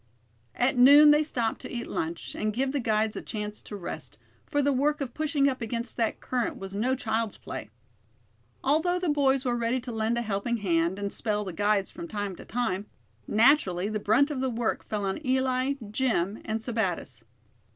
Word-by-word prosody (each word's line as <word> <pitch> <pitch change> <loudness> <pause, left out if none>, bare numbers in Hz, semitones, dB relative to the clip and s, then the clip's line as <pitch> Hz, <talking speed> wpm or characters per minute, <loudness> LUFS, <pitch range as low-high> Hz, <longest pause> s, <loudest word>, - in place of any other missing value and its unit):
At 250 0 +1
noon 290 +4 +9
they 295 +1 +5
stopped 240 -7 -1
to 255 - -8
eat 235 -1 -4
lunch, 165 +1 -4
and 215 0 -1
give 265 +2 0
the 285 - -1
guides 220 -2 +1
a - - -4
chance 210 -1 -5
to 210 - -8
rest, 190 -4 -7 0.3
for 290 0 +1
the 285 0 +3
work 295 +4 +1
of 265 -4 -4
pushing 300 -2 +1
up 260 -2 -1
against 230 +1 -3
that 225 -2 0
current 250 -2 -2
was 195 0 -7
no 240 +6 +1
child's 225 -3 -2
play. - - -7 0.9
Although 320 +6 +2
the 360 -2 -1
boys 275 -2 +2
were 245 -1 +1
ready 235 +2 0
to 245 0 -6
lend 225 +1 0
a 235 - 0
helping 220 +2 -1
hand, 175 -3 +1
and 200 0 -3
"spell" 210 -2 -1
the 185 - -5
guides 205 +1 +1
from 340 +2 -7
time 205 - -4
to - - -11
time, 210 -5 -2 0.4
naturally 210 -6 +3
the 215 0 -2
brunt 245 +9 +3
of 265 -3 -2
the 265 - +1
work 235 -1 -1
fell 210 -2 -3
on 195 +10 -3
Eli, 260 0 +1 0.2
Jim 215 -5 0
and 220 0 -2
Sebattis. 190 - -2
235 Hz, 195 wpm, -28 LUFS, 210-265 Hz, 0.9 s, noon